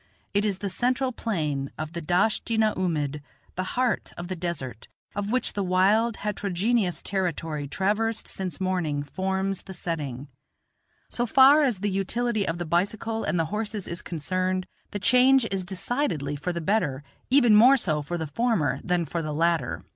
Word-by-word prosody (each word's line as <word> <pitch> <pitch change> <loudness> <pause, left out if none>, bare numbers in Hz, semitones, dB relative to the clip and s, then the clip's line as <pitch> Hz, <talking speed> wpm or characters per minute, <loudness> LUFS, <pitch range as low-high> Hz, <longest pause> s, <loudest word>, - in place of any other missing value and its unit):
It 205 +1 +2
is 200 -3 0
the 200 - -4
central 250 +6 0
plain 150 - -2
of 155 +1 -5
the 170 - -4
Dasht 180 +8 +1
i - - +2
na 220 -1 +3
oomid, 150 -5 -1 0.3
the 185 - -2
heart 250 -2 0
of 175 +1 -6
the 185 - -2
desert, 160 -10 -5 0.3
of 205 0 -2
which 255 +1 +1
the 205 - -2
wild, 200 +5 +3
heterogeneous 205 0 0
territory 165 -6 -2
traversed 215 +8 0
since 190 -1 -4
morning 175 -6 -1
forms 190 +5 -2
the 190 - -9
setting. 145 -6 -4 0.8
So 240 0 -2
far 270 +5 +7
as 245 -10 +1
the 205 -1 0
utility 215 +3 0
of 165 - -1
the 175 - -3
bicycle 205 +7 -1
and - - 0
the 165 - +2
horses 215 -2 -3
is 170 +1 -4
concerned, 185 +3 -2 0.2
the - - -4
change 250 +4 +5
is 195 -1 -1
decidedly 180 - -2
for 150 +5 -3
the 170 -1 -4
better, 155 -8 0 0.3
even 250 -4 +5
more 250 +6 +7
so 155 - 0
for 175 +4 -4
the 160 - -3
former 220 0 0
than 175 -2 0
for 170 +3 -3
the 155 -2 -4
latter. 165 +1 0
185 Hz, 175 wpm, -26 LUFS, 165-220 Hz, 0.8 s, far